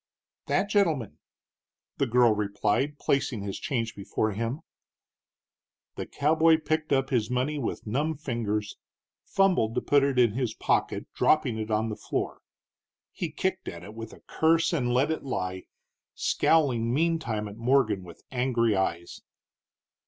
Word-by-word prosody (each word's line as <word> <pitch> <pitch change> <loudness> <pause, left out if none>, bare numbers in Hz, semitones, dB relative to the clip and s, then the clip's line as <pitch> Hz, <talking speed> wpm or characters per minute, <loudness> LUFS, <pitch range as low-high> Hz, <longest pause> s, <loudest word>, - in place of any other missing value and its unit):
"That 195 - +1
gentleman," 165 - +1 0.8
the 140 - +1
girl 120 -1 +4
replied, 105 +7 0
placing 130 -8 0
his 100 -1 -4
change 115 -4 -2
before 105 +2 -1
him. 115 +8 -3 1.3
The - - -6
cowboy 160 +2 +3
picked 155 0 -2
up 135 -1 +1
his 115 -4 +1
money 130 +4 -1
with 120 - -4
numb 145 +8 -1
fingers, 110 -7 -3 0.5
fumbled 180 - +2
to - - +1
put 145 -1 +3
it 140 -1 +1
in 120 -3 +5
his 120 -1 -2
pocket, - - 0
dropping 130 -8 +2
it 110 0 -4
on 110 +1 +1
the 105 - -3
floor. - - -4 0.7
He - - -4
kicked - - -2
at 85 0 -6
it 105 - -10
with 115 0 -8
a - - -15
curse 165 +2 +2
and 125 -7 0
let 130 +5 +2
it 160 - -2
lie, 95 -8 -4 0.5
scowling 125 -8 +2
meantime 145 -8 0
at 100 +1 -10
Morgan 115 -5 +2
with 85 -2 -13
angry 120 -4 +1
eyes. 85 -3 -2
125 Hz, 145 wpm, -27 LUFS, 110-145 Hz, 1.3 s, in